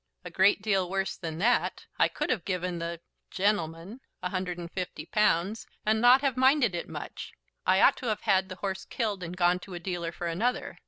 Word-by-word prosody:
"A 180 - -7
great 195 +3 +3
deal 195 -4 +1
worse 195 0 -1
than 160 -3 -6
that. 235 +8 +1
I - - +6
could - - -2
have 220 -9 -1
given 180 -2 -2
the 170 0 -4 0.3
gentleman 190 +2 -1 0.2
a - - -1
hundred 185 -2 -2
and 170 -1 -7
fifty 180 -1 -5
pounds, 210 0 +1 0.2
and 220 +1 +2
not 250 +2 +7
have 275 -3 +1
minded 260 -3 +4
it 170 - -4
much. - - -7 0.3
I - - +5
ought - - +6
to 255 - -5
have 215 -2 -1
had 190 0 +2
the 185 - -6
horse 190 0 -4
killed, 210 -5 -2
and 175 +1 -6
gone 180 0 +3
to 185 0 -9
a - - -5
dealer 175 -2 -3
for 175 - -6
another. 220 +10 -1
190 Hz, 210 wpm, -28 LUFS, 175-215 Hz, 0.3 s, not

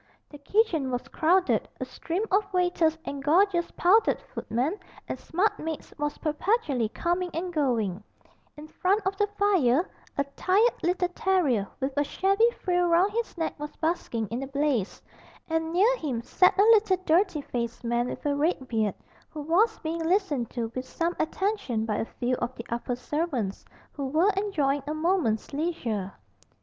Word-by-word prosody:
The 290 - -11
kitchen 325 - +1
was 245 -1 -3
crowded, 360 +4 +2
a - - -2
stream 345 +5 -3
of 395 +1 +2
waiters 355 -3 +2
and 280 -1 -5
gorgeous 345 +3 +3
powdered 425 +6 +4
footmen 275 - -2 0.3
and - - -4
smart 385 +6 0
maids 320 -1 -5
was 295 0 -2
perpetually 300 - 0
coming 350 +7 -1
and 350 +2 -3
going; 225 - 0 0.5
in 300 +1 -9
front 390 +6 0
of 385 +1 0
the 415 - +2
fire 355 -7 +3 0.3
a 280 - +3
tired 420 +6 +3
little 360 +1 +1
terrier, 335 - +1
with 265 0 -2
a 290 - +4
shabby 395 +9 +2
frill 355 -1 +2
round 345 +4 +4
his 460 -3 -3
neck, 325 - -1
was 295 0 -6
basking 315 -9 -2
in 235 +3 -3
the 270 - -4
blaze, 275 -7 -1 0.5
and 325 0 -1
near 410 +9 +4
him 260 - -3
sat 365 +10 +3
a 400 - +6
little 430 -3 +5
dirty 335 -1 +2
faced 235 -3 -4
man 240 +1 0
with - - -7
a 290 -1 +1
red 290 -2 0
beard, 220 -4 0 0.3
who 305 -2 -7
was 405 +9 +3
being 325 +1 -3
listened 325 - +1
to 230 -2 -4
with 255 0 -5
some 340 +1 -1
attention 315 - -1
by 210 -2 -1
a - - -1
few 245 +2 -3
of 245 +1 -3
the 230 - -8
upper 240 +1 -2
servants, 250 - -2 0.3
who 280 -2 -4
were 325 +9 +3
enjoying 300 -9 0
a 305 - -2
moment's 310 - 0
leisure. 240 - -2
320 Hz, 170 wpm, -27 LUFS, 255-370 Hz, 0.5 s, a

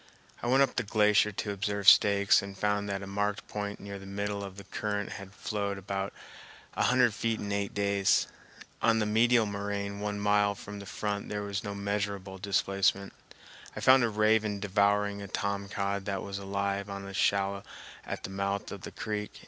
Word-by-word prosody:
I - - -3
went 135 +3 +5
up 135 - -2
the - - +3
glacier 105 -2 +3
to 105 +1 -3
observe 100 0 -2
stakes 100 -1 +7
and 100 0 -8
found 105 0 0
that 100 0 -3
a - - -5
marked 105 +3 -2
point 105 -1 -4
near 100 0 -7
the 95 - -11
middle 100 +1 -3
of 95 -1 -8
the 100 - -8
current 105 +1 -3
had 100 -1 -8
flowed 100 -1 -3
about 95 0 -3 0.6
a - - -2
hundred 125 -2 +4
feet 115 +1 -1
in 100 - -4
eight 100 -1 -2
days. 100 -1 +2 0.6
On 115 -1 +4
the 110 - +1
medial 115 +2 +4
moraine 100 0 -3
one 105 0 -3
mile 105 0 +3
from 100 +1 -8
the 100 - -9
front 100 -1 -3
there 105 0 -3
was 100 0 -3
no 100 -1 -4
measureable 100 -1 -3
displacement. 100 0 +1 0.6
I - - -4
found 130 -1 +6
a 120 - +2
raven 110 -1 +2
devouring 100 0 +1
a 100 - -6
tom 100 0 -2
cod 100 -1 -2
that 100 -1 -2
was 100 0 -5
alive 100 0 -2
on 100 0 -6
a 100 - -8
shallow 100 0 +1 0.4
at - - -6
the - - -5
mouth 100 +1 -2
of 100 - -7
the - - -7
creek. 105 -1 -4
100 Hz, 195 wpm, -30 LUFS, 100-105 Hz, 0.6 s, stakes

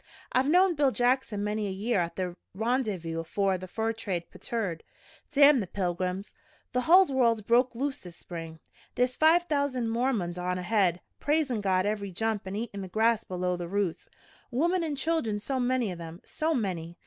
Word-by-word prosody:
I've 260 +2 +2
knowed 360 0 +4
Bill 285 -2 +4
Jackson 245 -4 +1
many 210 0 -1
a - - -3
year 200 +3 0
at 170 -1 -2
the 180 -2 -3 0.2
Rendyvous 210 -8 -1
afore 190 +3 0
the 185 - -7
fur 225 +4 -1
trade 185 -6 -4
petered. 200 -9 -3 0.5
Damn 285 -1 +6
the 200 - -3
pilgrims! 185 +1 -3 0.4
The 250 - +2
hull 360 +7 +7
world's 230 -4 +2
broke 240 +3 +3
loose 270 +3 -2
this 175 -2 -11
spring. 165 -2 -8 0.4
There's 250 0 +1
five 325 +3 +5
thousand 280 -7 0
Mormons 225 -8 0
on 180 0 -1
ahead, 180 -2 +1 0.2
praisin' 290 -7 +1
God 185 -1 +2
every 205 -1 -2
jump 215 +2 -2
an' 190 - -4
eatin' 210 -2 -4
the 190 - -5
grass 220 +4 +2
below 180 0 -2
the 175 -1 -5
roots. 195 -2 -2 0.4
Womern 340 +8 +1
an' 305 -3 -2
children 270 -8 0
so 260 +5 -2
many 245 -4 +1
of 175 -1 -7
'em, 165 +1 -8
so 315 +1 -1
many! 175 -7 -3
215 Hz, 180 wpm, -28 LUFS, 185-255 Hz, 0.5 s, hull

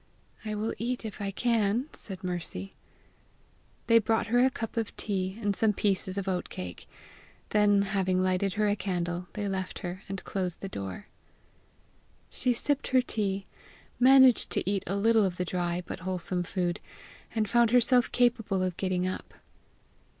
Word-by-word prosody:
"I 215 -1 -3
will 215 +2 -2
eat 245 0 -2
if 215 -1 -6
I 200 - -1
can," 230 +3 +1
said 190 -3 -8
Mercy. 170 - -3 1.1
They 230 0 +6
brought 225 +1 +1
her 245 - +5
a 260 - +5
cup 225 -3 -6
of 225 -2 -3
tea 190 -1 -2
and 205 -3 0
some 220 0 +2
pieces 190 -1 0
of 200 -1 -3
oat 185 -2 -1
cake; 90 -1 -7 0.6
then, 205 -1 +4
having 190 -2 +1
lighted 185 +1 +1
her 210 0 +1
a 205 - +2
candle, 175 -2 -2
they 205 -1 -3
left 190 -1 -3
her, 180 +2 -5
and 195 -1 -5
closed 185 -3 -2
the 195 - -4
door. 95 - -6 1.3
She 250 - +1
sipped 280 +4 0
her 255 0 +4
tea, 200 -4 -2 0.5
managed 260 -1 +6
to - - -1
eat 200 -1 0
a 195 - -1
little 220 +2 +4
of 185 -2 -1
the 180 - -1
dry 175 0 -2
but - - -6
wholesome 185 -1 -2
food, 175 0 -2 0.6
and 215 -1 +1
found 235 +2 +4
herself 245 +1 +4
capable 230 -6 +2
of 185 -2 -2
getting 185 -1 0
up. 185 - -6
200 Hz, 165 wpm, -29 LUFS, 185-225 Hz, 1.3 s, They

